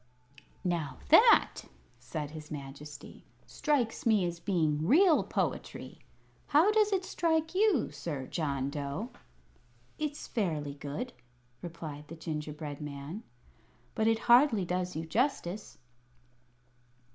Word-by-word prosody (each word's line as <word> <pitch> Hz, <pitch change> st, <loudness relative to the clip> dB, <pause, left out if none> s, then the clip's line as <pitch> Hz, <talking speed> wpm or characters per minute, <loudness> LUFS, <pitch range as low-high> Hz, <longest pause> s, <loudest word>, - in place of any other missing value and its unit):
'" 150 Hz, -, -29 dB, 0.2 s
"Now 170 Hz, -5 st, -1 dB
that," -, -, +6 dB, 0.4 s
said 150 Hz, +3 st, -5 dB
his 155 Hz, -1 st, -9 dB
Majesty, 140 Hz, 0 st, -9 dB, 0.2 s
"strikes 255 Hz, -7 st, 0 dB
me 215 Hz, -5 st, +3 dB
as 170 Hz, -1 st, -3 dB
being 160 Hz, -4 st, 0 dB
real 330 Hz, -, +6 dB
poetry. -, -, -3 dB, 0.5 s
How 315 Hz, +8 st, +5 dB
does 425 Hz, -1 st, +3 dB
it 380 Hz, -2 st, +1 dB
strike 320 Hz, -2 st, 0 dB
you, 385 Hz, -, +3 dB
Sir 145 Hz, -6 st, -5 dB
John 140 Hz, -3 st, -2 dB
Dough?" 145 Hz, -, -4 dB, 0.9 s
"It's 300 Hz, -1 st, -3 dB
fairly 155 Hz, -, -2 dB
good," 145 Hz, -, -5 dB, 0.5 s
replied 155 Hz, -4 st, -7 dB
the 165 Hz, -, -8 dB
gingerbread 150 Hz, -2 st, -5 dB
man; 145 Hz, +6 st, -6 dB, 0.7 s
"but 220 Hz, -, +1 dB
it 225 Hz, 0 st, +4 dB
hardly 240 Hz, -5 st, +6 dB
does 180 Hz, +1 st, -2 dB
you 160 Hz, +1 st, -3 dB
justice." 215 Hz, -, -1 dB
170 Hz, 115 wpm, -31 LUFS, 150-245 Hz, 0.9 s, that